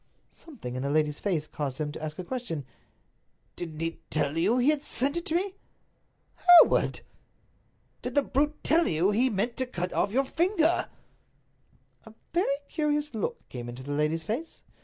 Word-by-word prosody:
Something 245 - -9
in 130 - -3
the 140 - -1
lady's 150 0 +1
face 170 -7 0
caused 140 -4 -4
him 150 -1 -2
to 155 - -8
ask 155 0 -5
a 185 - -4
question; 175 - -4 0.9
"Didn't 160 -3 -6
he 165 0 -3
tell 150 -1 0
you 190 +9 +2
he 255 +3 +4
had 300 -2 -1
sent 280 +1 -1
it 340 - -3
to 320 - -1
me?" 380 +2 0 0.8
"Hereward!" 355 -2 +6 1.0
"Did - - -5
the 285 - +5
brute 295 +3 0
tell 335 +1 +3
you 170 +5 +2
that 210 - -1
he 260 +1 +4
meant 230 +3 -1
to 260 - -1
cut 180 -6 -4
off - - +1
your 265 +5 +2
little 265 - -15
finger?" 340 -1 +2 1.2
A 220 - -13 0.2
very 350 +3 +2 0.2
curious 295 -1 -1
look 220 - -4
came 120 -1 -6
into 125 +2 -8
the 145 - -6
lady's 150 +2 0
face. 245 - -5
215 Hz, 180 wpm, -28 LUFS, -, 1.2 s, Hereward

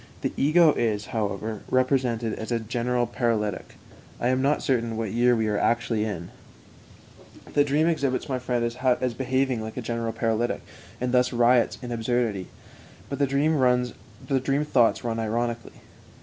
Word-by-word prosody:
The - - -2
ego 155 +2 +5
is, 105 -3 -1
however, 110 -1 -2
represented 125 -3 +1
as 110 - -6
a 120 - +1
general 120 +2 -1
paralytic 115 -4 -2 0.4
("I 120 - +1
am 130 0 +1
not 140 +2 +1
certain 115 -4 0
what 110 -3 -2
year 120 +1 +3
we 110 -1 0
are 105 -1 0
actually 115 -2 +1
in"). 85 -5 -5 1.2
The 145 - +5
dream 145 +2 +2
exhibits 140 -6 0
my 130 -2 -2
friend 125 -1 -1
as 125 +1 0
behaving 130 -1 0
like 110 +2 -7
a - - -2
general 115 0 -2
paralytic, 115 +1 -1 0.4
and 125 0 -1
thus 125 0 +3
riots 120 0 +3
in 120 - -5
absurdity. 115 -4 -1 0.6
But 140 - -4
the 140 - +3
dream 145 +4 +2 1.1
thoughts 120 -6 +3
run 115 -1 -2
ironically. 115 +1 -3
120 Hz, 150 wpm, -25 LUFS, 115-130 Hz, 1.2 s, ego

